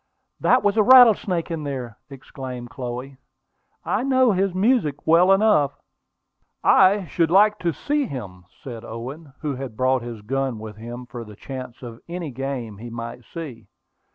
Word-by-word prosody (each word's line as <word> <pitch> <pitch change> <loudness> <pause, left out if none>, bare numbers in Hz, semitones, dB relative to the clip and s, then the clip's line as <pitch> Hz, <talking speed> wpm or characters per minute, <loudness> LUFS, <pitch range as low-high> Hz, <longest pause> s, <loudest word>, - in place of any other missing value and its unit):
"That 255 - +3
was 205 +2 +1
a - - +6
rattlesnake 215 -8 +6
in 160 -2 -3
there!" 130 -6 -5
exclaimed 130 -3 -8
Chloe. 125 +2 -6 0.7
"I - - 0
know 260 -2 +3
his 195 0 +1
music 185 - +1
well 170 +4 +5
enough." 195 -9 +3 0.9
"I 190 +1 +5
should 165 +1 0
like 210 +4 +4
to 170 - 0
see 290 - -1
him," 95 - -8 0.2
said 120 -4 -8
Owen, 135 +7 -8
who 145 -3 -2
had 130 -5 -7
brought 130 0 +2
his 115 -2 -7
gun 135 +2 -2
with 110 -1 -9
him 120 +3 -8
for 120 -1 -8
the 105 -2 -12
chance 130 +1 -8
of 115 -1 -9
any 170 -4 -5
game 125 -5 -5
he 120 +2 -8
might 115 +1 -7
see. 135 -9 -8
135 Hz, 160 wpm, -23 LUFS, 120-185 Hz, 0.9 s, a